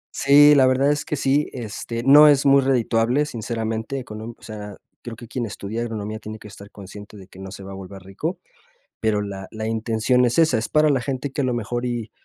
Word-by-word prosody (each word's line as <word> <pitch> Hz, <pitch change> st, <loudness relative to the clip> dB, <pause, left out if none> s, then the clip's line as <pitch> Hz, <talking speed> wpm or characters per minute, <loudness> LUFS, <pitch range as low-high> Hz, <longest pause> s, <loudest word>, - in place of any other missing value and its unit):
Sí, 145 Hz, +2 st, +6 dB
la 135 Hz, -3 st, +5 dB
verdad 135 Hz, +2 st, +2 dB
es 150 Hz, 0 st, -2 dB
que -, -, -3 dB
sí. 140 Hz, +1 st, +1 dB
Este, 115 Hz, -1 st, -6 dB
no 145 Hz, +3 st, +8 dB
es 145 Hz, -1 st, +4 dB
muy 140 Hz, 0 st, +5 dB
redituable, 125 Hz, +1 st, +1 dB
sinceramente, 115 Hz, 0 st, -4 dB
con 105 Hz, 0 st, -9 dB
un 115 Hz, +1 st, -8 dB
o -, -, -25 dB
sea, 105 Hz, -2 st, -9 dB, 0.2 s
creo 120 Hz, -2 st, -8 dB
que 120 Hz, +1 st, -12 dB
quien 120 Hz, 0 st, -4 dB
estudia 105 Hz, +2 st, -6 dB
agronomía 110 Hz, -2 st, -5 dB
tiene 110 Hz, 0 st, -8 dB
que 105 Hz, -, -13 dB
estar 100 Hz, 0 st, -13 dB
consciente 105 Hz, +1 st, -12 dB
de 95 Hz, -, -12 dB
que 95 Hz, -, -16 dB
no 95 Hz, 0 st, -8 dB
se 95 Hz, +1 st, -10 dB
va 95 Hz, -, -9 dB
a -, -, -8 dB
volver 95 Hz, 0 st, -10 dB
rico. 125 Hz, -, -5 dB, 0.6 s
Pero 110 Hz, -2 st, 0 dB
la 100 Hz, -2 st, -6 dB
la 110 Hz, 0 st, -5 dB
intención 115 Hz, +2 st, +1 dB
es 120 Hz, +3 st, 0 dB
esa. 160 Hz, -6 st, +4 dB
Es 110 Hz, +1 st, -3 dB
para 155 Hz, 0 st, +3 dB
la 135 Hz, -4 st, +1 dB
gente 135 Hz, +1 st, -4 dB
que, 140 Hz, -, -2 dB
a -, -, -1 dB
lo 125 Hz, -, 0 dB
mejor, 120 Hz, +1 st, -3 dB
y 120 Hz, -3 st, -4 dB
115 Hz, 235 wpm, -22 LUFS, 105-135 Hz, 0.6 s, no